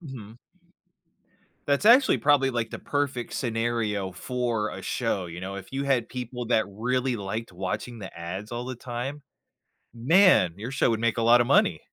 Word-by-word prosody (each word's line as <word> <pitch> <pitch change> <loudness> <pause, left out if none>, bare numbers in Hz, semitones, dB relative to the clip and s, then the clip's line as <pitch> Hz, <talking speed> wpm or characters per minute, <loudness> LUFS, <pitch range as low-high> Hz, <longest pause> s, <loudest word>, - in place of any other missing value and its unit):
Mhm. 120 - -10 1.3
That's 140 +4 +1
actually 250 +5 +6
probably, 140 -2 +3
like, 115 -3 -2
the - - -6
perfect 140 -4 -2
scenario 115 -5 -1
for 120 0 -2
a - - -7
show, 95 -2 -2
you 85 +1 -8
know, 95 +1 -5
if 95 +4 -10
you 135 +1 -2
had 130 -5 +1
people 125 -1 -6
that 110 -2 +2
really 125 +5 -1
liked 110 +2 -5
watching 95 +6 -4
the 95 -5 -9
ads 95 +6 -6
all 120 +1 -4
the 130 0 -6
time? 125 +4 -5 0.7
Man, 150 - +5
your 110 +4 -6
show 135 -3 +1
would 110 - -1
make 115 0 0
a 115 - 0
lotta 120 +1 +6
money. - - +3
120 Hz, 170 wpm, -26 LUFS, 105-130 Hz, 1.3 s, actually